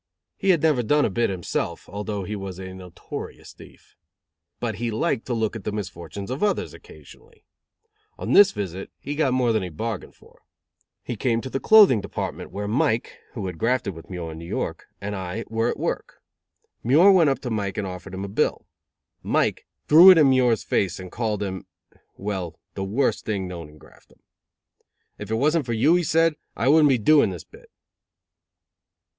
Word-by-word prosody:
He 195 - -2
had 170 -5 +4
never 150 -6 +3
done 145 +5 +2
a - - -1
bit 115 +5 +1
himself, 85 -2 -3
although 105 0 -4
he 105 +3 -5
was 95 -2 -6
a 95 0 -8
notorious 90 -2 -9
thief. - - -17 0.6
But 110 -4 -3
he 120 +2 -2
liked 110 +1 -1
to 125 - -1
look 110 -1 -1
at 110 - -7
the 105 - -3
misfortunes 100 0 -6
of 130 - -4
others, 210 -1 0
occasionally. 460 0 -16 0.7
On - - -2
this 200 -1 +8
visit 95 -2 -5
he 145 - -5
got 145 -3 +1
more 125 -2 +2
than 110 - +1
he 90 - -4
bargained 110 +5 -5
for. - - -22 0.6
He 120 - -4
came 115 +1 0
to 130 - -7
the 135 - -1
clothing 205 - +6
department - - -5
where 100 +1 -5
Mike, 115 0 0
who 105 -6 -5
had 90 -3 -6
grafted 120 -4 0
with 80 -1 -13
Muir 85 -3 -5
in 80 - -9
New 85 - -9
York, - - -4
and 105 +1 -4
I, 95 +4 -5
were 115 +1 0
at - - -3
work. - - -4 0.6
Muir 155 - +6
went 175 -6 +5
up 135 - +1
to 125 - -4
Mike 100 -3 -2
and 105 - -2
offered 95 0 -7
him 95 +1 -4
a - - -6
bill. 100 - -1 0.6
Mike - - 0 0.2
threw 170 +5 +9
it 185 - +9
in 145 -4 +6
Muir's 125 -4 +3
face 95 -2 -1
and 90 -1 -9
called 110 -3 -2
him 95 -2 -5 0.5
well, 95 -5 -4 0.2
the 95 - -4
worst 115 +8 0
thing 100 -4 -2
known 85 -4 -8
in 75 - -17
Graftdom. - - -21 1.0
"If 105 - -7
it 110 - 0
wasn't 150 +3 +1
for 120 - -1
you," 130 +9 +3
he 180 - +3
said, 165 0 +2 0.2
"I 115 +6 +1
wouldn't 150 0 +6
be 130 - +4
doing 145 +3 +4
this 90 -3 -7
bit." - - -18
110 Hz, 195 wpm, -24 LUFS, 95-135 Hz, 1.0 s, threw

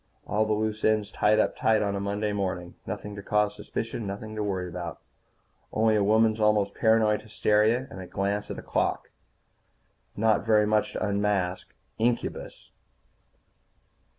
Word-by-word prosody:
All 110 +1 0
the 110 - +1
loose 110 0 -2
ends 110 -1 +2
tied 105 +1 +3
up - - +2
tight 110 -1 +2
on 100 -1 -1
a - - -2
Monday 105 +1 -2
morning. 90 -3 -3
Nothing 105 0 -5
to 100 - -7
cause 105 +1 +1
suspicion. 115 -1 -5
Nothing 105 +2 -6
to 105 - -2
worry 95 -3 -2
about. 85 -2 -6 0.7
Only 110 0 +2
a 105 - +3
woman's 110 +1 +3
almost 105 -2 +2
paranoid 110 -1 +3
hysteria, 110 +3 +2
and 95 - -8
a 90 - -8
glance 100 +3 -2
at - - -5
a - - -8
clock. - - -1 1.1
Not 110 -1 +2
very 105 -1 +4
much 105 0 +1
to - - -2
unmask 100 -3 0 0.3
incubus. 120 +1 -2
105 Hz, 155 wpm, -27 LUFS, 100-110 Hz, 1.1 s, very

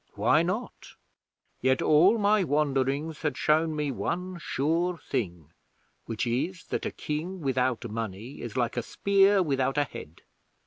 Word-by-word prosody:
Why 115 +10 +4
not? 190 +8 -4 0.7
'Yet 130 +1 +3
all 175 +9 +5
my 210 -1 +3
wanderings 145 0 0
had 150 - -1
shown 155 +1 +2
me 150 -2 -1
one 180 +7 -3
sure 170 +4 0
thing, 85 - -4 0.5
which 115 0 -2
is, 150 +10 -2
that - - -2
a - - -4
King 165 +5 -4
without 130 -4 0
money 115 +3 -6
is 120 -1 -6
like 120 -1 0
a - - +2
spear 195 - +3
without 135 -3 0
a 145 - +4
head. 80 - -10
145 Hz, 145 wpm, -28 LUFS, 125-175 Hz, 0.7 s, all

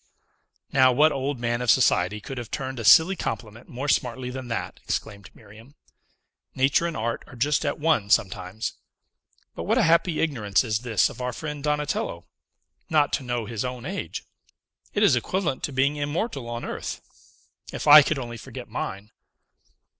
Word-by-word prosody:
"Now, 130 -1 +6
what 150 +5 +4
old 135 0 -2
man 120 0 -1
of 125 - -2
society 105 -5 +3
could 130 +4 -7
have 120 - -7
turned 130 -2 -4
a - - -4
silly 170 - +7
compliment 115 - -6
more 130 +4 -5
smartly 125 -2 0
than 130 -1 -7
that!" 115 - -4
exclaimed 100 -2 -4
Miriam. 110 +6 -16 0.8
"Nature 135 +6 +2
and 165 - -4
art 115 +1 -2
are - - -13
just 145 +5 +1
at 145 - -1
one 150 -10 +1
sometimes. 95 0 0 0.8
But - - -6
what 225 +5 +2
a 245 - +4
happy 170 -1 +3
ignorance 115 -11 +1
is 110 -3 -1
this 115 -3 +1
of - - -10
our 125 0 -2
friend 150 +1 -6
Donatello! 150 -1 -2 0.6
Not 150 -3 +2
to - - 0
know 120 -2 -2
his 115 -1 -4
own 125 -1 -5
age! 190 +6 -5 0.7
It 205 - +1
is 185 -11 +5
equivalent 160 +3 -1
to - - -6
being 140 +2 +1
immortal 145 - -3
on 120 0 -5
earth. - - -5 0.7
If - - -5
I 150 +1 +11
could 150 +1 -1
only 120 -3 -6
forget - - -9
mine!" 100 +3 -5
130 Hz, 170 wpm, -25 LUFS, 115-150 Hz, 0.8 s, I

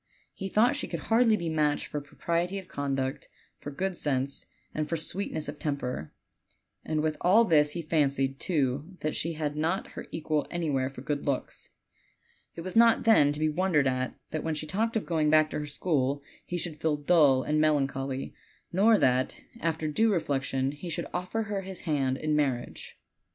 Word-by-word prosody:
He 195 -1 -5
thought 220 +5 +4
she - - -2
could - - -4
hardly 225 -1 +5
be 170 - -4
matched 155 -2 +1
for 150 - -4
propriety 170 +6 -2
of 190 -2 -7
conduct, 135 -2 -3 0.3
for - - -6
good 185 +6 -2
sense, 140 -3 0 0.3
and 155 -1 -2
for 165 - 0
sweetness 160 -1 -3
of 145 0 -7
temper; 125 - -3 0.7
and 155 -1 -1
with 155 0 -1
all 210 +6 +5
this 150 -5 +4
he 170 - -4
fancied, 140 -4 +1
too, 145 +1 -1
that 155 - -1
she 165 +1 0
had 150 -2 -3
not 165 +5 -1
her - - -8
equal 155 -2 -1
anywhere 145 -7 -1
for 135 -2 -10
good 145 +1 -3
looks. 140 -2 -3 0.9
It 170 - -6
was 185 +1 -6
not, 230 0 +6
then, 180 -11 +5
to 145 - -4
be 155 - +2
wondered 155 -2 +2
at 130 0 -1 0.2
that 155 - -3
when 160 -1 -1
she 155 - -3
talked 220 +8 0
of 220 - -3
going 155 -3 +1
back 155 0 +4
to - - -2
her 150 - -4
school 145 -3 0 0.2
he 175 - -2
should 160 -3 -5
feel 155 -2 +1
dull 145 -4 +4
and 155 0 +1
melancholy, 135 -3 0 0.4
nor 210 +4 +5
that 130 -5 +1 0.2
after 160 -3 -1
due 220 +9 +2
reflection, 135 -6 0
he 150 +5 -8
should 165 - -2
offer 180 +5 -2
her 205 -2 -3
his 190 -1 -8
hand 135 -5 0
,n 155 +1 0
mar 145 -3 +3
riage. 120 - -10
155 Hz, 190 wpm, -28 LUFS, 140-175 Hz, 0.9 s, not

